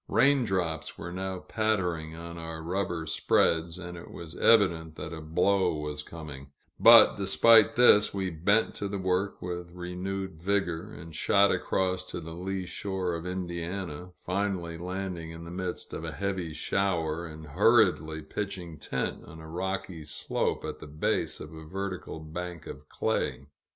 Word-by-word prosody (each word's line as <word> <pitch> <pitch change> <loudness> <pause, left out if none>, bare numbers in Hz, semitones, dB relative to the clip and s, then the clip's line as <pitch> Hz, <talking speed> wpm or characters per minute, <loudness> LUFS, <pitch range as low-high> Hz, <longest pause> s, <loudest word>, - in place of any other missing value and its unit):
Rain 135 -2 +4
drops 90 -6 -2
were 85 - -6
now 95 +1 -3
pattering 90 -7 -1
on 85 +1 -8
our 80 -1 -6
rubber 85 -2 -2
spreads, 80 +2 +2
and 90 -1 -7
it 85 - -10
was 85 -2 -9
evident 85 -8 +4
that 80 +1 -6
a 80 - -6
blow 90 +3 +2
was 75 -1 -4
coming; 75 -4 -9 0.3
but - - +9
despite 110 +2 +6
this, 110 -4 +7
we 95 -2 -2
bent 100 +7 +2
to 100 - -4
the 100 0 -3
work 95 +1 -1
with 90 -1 -4
renewed 90 0 -5
vigor, 95 0 0
and 80 -2 -10
shot 100 +4 +4
across 95 -1 0
to 90 - -6
the 80 -1 -8
lee 95 +2 -3
shore 95 -1 -3
of 85 +1 -4
Indiana 90 -1 -4
finally 95 -3 -2
landing 90 -1 -4
in 80 0 -8
the 85 - -8
midst 90 0 -4
of - - -5
a - - -4
heavy 95 -4 -2
shower, 85 0 -1
and 80 0 -10
hurriedly 85 - +3
pitching 85 -2 -5
tent 65 - -3
on 80 - -11
a 80 - -10
rocky 90 0 -3
slope 75 - -2
at - - -5
the 80 - -9
base 75 +1 -1
of 75 +2 -9
a 80 0 -9
vertical 95 -1 -5
bank 85 +2 -6
of - - -10
clay. 70 - -1
90 Hz, 160 wpm, -29 LUFS, 80-95 Hz, 0.3 s, but